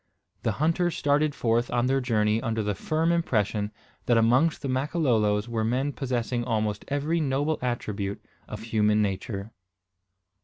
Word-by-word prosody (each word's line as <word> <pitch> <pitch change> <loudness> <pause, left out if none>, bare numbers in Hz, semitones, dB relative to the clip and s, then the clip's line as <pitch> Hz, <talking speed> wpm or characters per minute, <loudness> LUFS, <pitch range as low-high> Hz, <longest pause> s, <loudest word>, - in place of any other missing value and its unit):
The - - 0
hunters 165 +3 +1
started 145 +1 +2
forth 120 +1 +1
on 120 0 +1
their 135 +1 +2
journey 110 -3 +1
under 110 -1 -1
the 105 0 0
firm 160 - 0
impression 105 - 0 0.4
that 120 - +4
amongst 125 +10 +3
the - - -1
Makololo 130 -6 +1
were 115 -2 -1
men 130 +5 0
possessing 125 -2 -2
almost 110 -3 -1
every 145 +4 0
noble 145 +1 0
attribute 105 -5 -3 0.3
of 105 - -7
human 105 -1 +2
nature. 100 +1 -3
120 Hz, 145 wpm, -26 LUFS, 105-145 Hz, 0.4 s, that